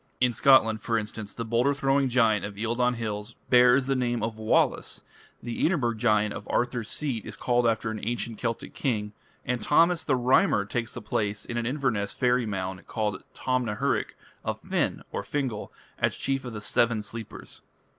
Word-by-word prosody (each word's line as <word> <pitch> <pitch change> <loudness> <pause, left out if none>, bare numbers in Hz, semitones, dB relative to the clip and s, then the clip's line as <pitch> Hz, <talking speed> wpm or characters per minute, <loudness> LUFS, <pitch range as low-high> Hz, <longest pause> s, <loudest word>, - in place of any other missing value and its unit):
In 125 -1 +3
Scotland, 110 -4 +5
for 115 0 0
instance, 105 -1 -5
the 115 - -5
boulder 120 +5 +2
throwing 135 -1 +2
giant 115 -5 +3
of 100 0 -5
Eildon 120 +3 +1
hills 110 0 -4 0.2
bears 125 +1 +6
the 135 0 +1
name 120 -3 0
of 110 -1 -3
Wallace, 110 - +1 0.4
the 120 -1 -3
Edinburgh 140 -9 +2
giant 105 -2 +2
of 105 - -8
Arthur's 120 -2 -1
Seat 130 -8 -1
is - - -7
called 120 -1 +1
after 110 0 0
an 110 - -4
ancient 115 0 -3
Celtic 115 -2 -3
king, 105 -6 -2 0.3
and 125 -1 -1
Thomas 170 +3 +4
the 135 - +2
Rhymer 125 -5 +3
takes 115 +2 -3
the 120 - -7
place, 105 -1 -1
in 120 - -5
an 120 -1 -1
Inverness 125 -7 -1
fairy 125 -2 +2
mound 95 -2 -4
called 105 -4 -2
Tom 130 -1 0
na 105 -2 -2
hurich, - - -1 0.3
of - - -3
Finn - - -1 0.2
(Fingal) 130 -7 -3 0.3
as - - +1
chief 135 -1 -1
of 120 - -6
the 105 - -6
"Seven 115 0 +1
Sleepers". 110 +2 -8
115 Hz, 180 wpm, -27 LUFS, 110-125 Hz, 0.4 s, bears